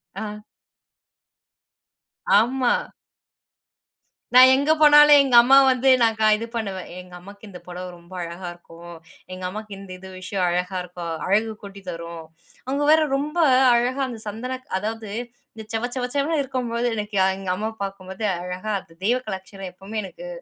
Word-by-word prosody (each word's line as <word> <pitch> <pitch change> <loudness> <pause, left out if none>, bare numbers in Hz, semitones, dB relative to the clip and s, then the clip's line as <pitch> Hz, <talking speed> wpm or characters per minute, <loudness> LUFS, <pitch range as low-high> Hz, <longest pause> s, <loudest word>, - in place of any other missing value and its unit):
ஆ. 210 +1 -6 2.0
ஆமா. 250 +2 +1 1.6
நா 250 - +8
எங்க 285 +3 +2
போனாலும் 295 -1 +8
எங்க 260 -3 +1
அம்மாவ 270 +3 +6
வந்து 255 +1 +2
நான் 225 -1 +3
க - - +1
இது 225 - -5
பண்ணுவேன். 195 -5 -4
எங்க 180 0 -13
அம்மாக்கு 200 +4 -13
இந்த 180 - -10
புடவை 180 +1 -7
ரொம்ப 170 +2 -17
அழகா 170 +1 -7
இருக்கும். 170 0 -13 0.4
எங்க 185 0 -8
அம்மாக்கு 215 +2 -8
இந்த 195 -1 -11
இது 190 +1 -12
விஷயம் 185 0 -2
அழகா 180 +2 -2
இருக்கும். 175 -1 -7 0.2
அழகு 215 +4 +2
கூட்டித்தரும். 170 -4 -8 0.4
அவுங்க 275 +3 -1
வேற 315 0 +6 0.2
ரொம்ப 300 +4 -4 0.4
அழகா 245 +3 +1
அந்த 240 -3 -7
சந்தன 250 +5 -5 0.2
அதாவது 220 +1 -5 0.5
இந்த 220 - -8
செவ 225 +2 -1
செவ 250 -1 -1
செவன்னு 295 +3 +1
இருக்கும்பொழுது 245 -3 -2
எனக்கு 210 -1 -5
எ - - +4
எங்க 195 -1 -6
அம்மா 215 +3 -3
பாக்கும்போது 195 +1 -6 0.2
அழகா 180 +4 -5
அது 165 - -18
தெய்வகலாட்சணம் 195 -4 -3
எப்பவுமே 195 +4 -7
எனக்கு - - -10
210 Hz, 145 wpm, -23 LUFS, 185-250 Hz, 2.0 s, நா